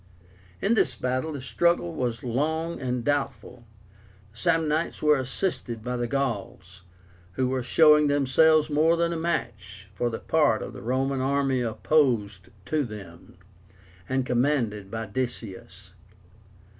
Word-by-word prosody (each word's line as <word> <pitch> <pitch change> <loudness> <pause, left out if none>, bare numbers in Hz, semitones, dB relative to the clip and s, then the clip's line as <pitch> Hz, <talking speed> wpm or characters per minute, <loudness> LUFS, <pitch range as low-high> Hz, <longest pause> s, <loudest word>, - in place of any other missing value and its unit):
In 205 - +3
this 185 - +2
battle 130 +6 -2
the 140 - -6
struggle 170 +5 +1
was 120 -6 -3
long 160 +7 -2
and 125 -2 -2
doubtful. 135 -4 -2 0.7
The 110 - -21
Samnites 160 -1 0
were 150 -2 +4
assisted 130 - -3
by 125 +1 -3
the 120 -1 -2
Gauls, 100 -8 -4 0.5
who 130 +6 0
were 130 0 -1
showing 150 +4 +5
themselves 145 +2 +4
more 160 +2 +3
than 170 0 +1
a - - -3
match 105 - -4
for 120 +5 -1
the 115 - -4
part - - +1
of - - -8
the - - -9
Roman 130 +2 -1
army 135 -1 +1
opposed 115 - +1 0.2
to 150 +8 0
them, 95 -8 -10 0.7
and 130 0 0
commanded 120 -6 0
by 115 +1 -4
Decius. 100 -5 -6
130 Hz, 135 wpm, -26 LUFS, 115-150 Hz, 0.7 s, showing